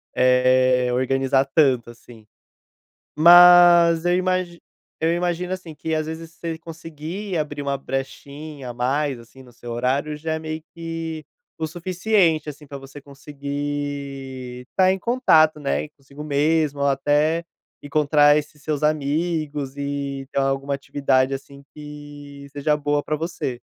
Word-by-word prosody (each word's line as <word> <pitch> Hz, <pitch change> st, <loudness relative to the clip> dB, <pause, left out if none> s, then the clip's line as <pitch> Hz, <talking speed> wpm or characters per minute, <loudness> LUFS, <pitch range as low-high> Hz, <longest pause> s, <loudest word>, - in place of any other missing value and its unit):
eh, 125 Hz, 0 st, +3 dB
organizar 135 Hz, +1 st, +1 dB
tanto 130 Hz, -7 st, +3 dB
assim. 115 Hz, -1 st, -16 dB, 0.9 s
Mas 175 Hz, 0 st, +8 dB
eu 175 Hz, 0 st, +3 dB
imagi 185 Hz, -2 st, -1 dB, 0.4 s
eu 165 Hz, -, +3 dB
imagino, 175 Hz, +1 st, -2 dB
assim, 185 Hz, -4 st, -6 dB
que 160 Hz, +1 st, -3 dB
às 155 Hz, 0 st, -1 dB
vezes 160 Hz, +1 st, -7 dB
você 165 Hz, -1 st, -6 dB
conseguir 165 Hz, +4 st, -7 dB
abrir 145 Hz, -2 st, -3 dB
uma 140 Hz, 0 st, -1 dB
brechinha 140 Hz, +1 st, -6 dB
a -, -, -6 dB
mais, 135 Hz, +3 st, -1 dB
assim, 115 Hz, +3 st, -16 dB
no 125 Hz, -, -17 dB
seu 120 Hz, 0 st, -10 dB
horário, 130 Hz, +5 st, -1 dB
já 160 Hz, +2 st, -4 dB
é -, -, -1 dB
meio 155 Hz, 0 st, -5 dB
que 165 Hz, -2 st, -5 dB, 0.3 s
o 160 Hz, -, -2 dB
suficiente, 175 Hz, -1 st, +1 dB
assim, 150 Hz, 0 st, -11 dB
pra 140 Hz, 0 st, -7 dB
você 135 Hz, +1 st, -12 dB
conseguir 140 Hz, -2 st, -6 dB
estar 185 Hz, 0 st, +3 dB
em 190 Hz, -, -2 dB
contato, 160 Hz, -, +3 dB
né, 145 Hz, +1 st, -2 dB
consigo 140 Hz, +1 st, -11 dB
mesmo 150 Hz, 0 st, +1 dB
ou -, -, +2 dB
até 145 Hz, +4 st, +1 dB, 0.4 s
encontrar 145 Hz, 0 st, +4 dB
esses 150 Hz, 0 st, -6 dB
seus 150 Hz, -1 st, -2 dB
amigos 150 Hz, -1 st, -1 dB
e 140 Hz, -1 st, -4 dB
ter -, -, -6 dB
alguma 135 Hz, +1 st, -1 dB
atividade, 135 Hz, -1 st, 0 dB
assim, 140 Hz, +1 st, -9 dB
que 145 Hz, -1 st, -11 dB
seja 150 Hz, +1 st, 0 dB
boa 145 Hz, 0 st, 0 dB
pra 155 Hz, -, -2 dB
você. 150 Hz, -6 st, -4 dB
145 Hz, 140 wpm, -22 LUFS, 135-160 Hz, 0.9 s, Mas